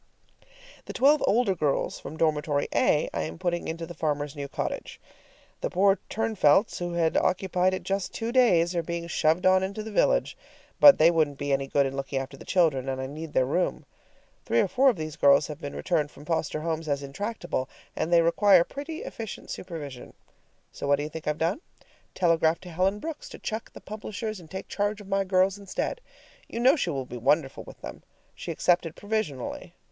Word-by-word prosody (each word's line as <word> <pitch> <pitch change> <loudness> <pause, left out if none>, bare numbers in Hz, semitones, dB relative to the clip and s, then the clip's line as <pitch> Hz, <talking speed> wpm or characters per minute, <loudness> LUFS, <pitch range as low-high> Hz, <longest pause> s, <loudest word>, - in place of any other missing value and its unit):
The - - -7
twelve 290 +3 +4
older 220 -2 +3
girls 150 -6 -1
from 160 - -8
dormitory 150 -2 +1
A - - +3
I - - -1
am 80 +1 -5
putting 175 - -2
into 165 +1 -4
the 175 - -9
farmer's 150 -2 -2
new 140 -1 -5
cottage. - - -5 0.6
The - - -2
poor 195 +1 +3
Turnfelts, 215 -4 +2
who 175 -1 -3
had 165 -2 +1
occupied 185 0 +1
it - - -7
just 195 -1 -2
two 230 0 -3
days, 180 -9 +4
are 170 - +1
being 170 +1 -4
shoved 170 +1 +1
on 185 0 +5
into 200 +3 -3
the 220 - -7
village. - - +2 0.4
But 285 -1 +9
they 165 +2 +6
wouldn't 155 -4 +1
be 145 0 -1
any 135 0 0
good 140 +1 +2
in 135 0 -3
looking 135 0 -3
after 135 +1 -4
the - - -13
children, 150 -8 +2
and 130 0 -3
I 130 - -3
need 155 +3 -7
their 130 - +3
room. 175 +7 -1 0.6
Three - - +1
or - - +3
four 270 +1 +4
of 250 - +1
these 155 -2 -5
girls 140 0 +5
have 150 +1 -8
been 145 - -6
returned 155 -5 0
from 145 0 -14
foster 155 -2 -1
homes 160 0 -3
as 140 0 -1
intractable, 175 - -4 0.3
and 160 +2 -2
they 170 -1 +6
require 185 +1 +5
pretty 290 - -7
efficient 225 -3 -7
supervision. 150 -8 -7 0.6
So - - -6
what 140 - +5
do 145 - -4
you 150 - -4
think 160 0 -8
I've 150 0 0
done? 170 - -1 0.5
Telegraphed 165 -1 +2
to 180 - -9
Helen 185 +4 +1
Brooks 315 +7 -7
to - - -9
chuck 220 0 -5
the - - -11
publishers 215 0 -6
and 165 -3 -14
take 190 - -7
charge 205 +1 -1
of 205 - -12
my 195 0 +1
girls 190 +1 +2
instead. 200 - -3 0.5
You 230 - -5
know 255 +5 +5
she 270 - -1
will 135 -5 -3
be 125 0 -8
wonderful 135 +3 +1
with - - -13
them. - - -8 0.3
She - - -8
accepted 170 -2 +1
provisionally. 205 - -4
170 Hz, 205 wpm, -27 LUFS, 145-200 Hz, 0.6 s, But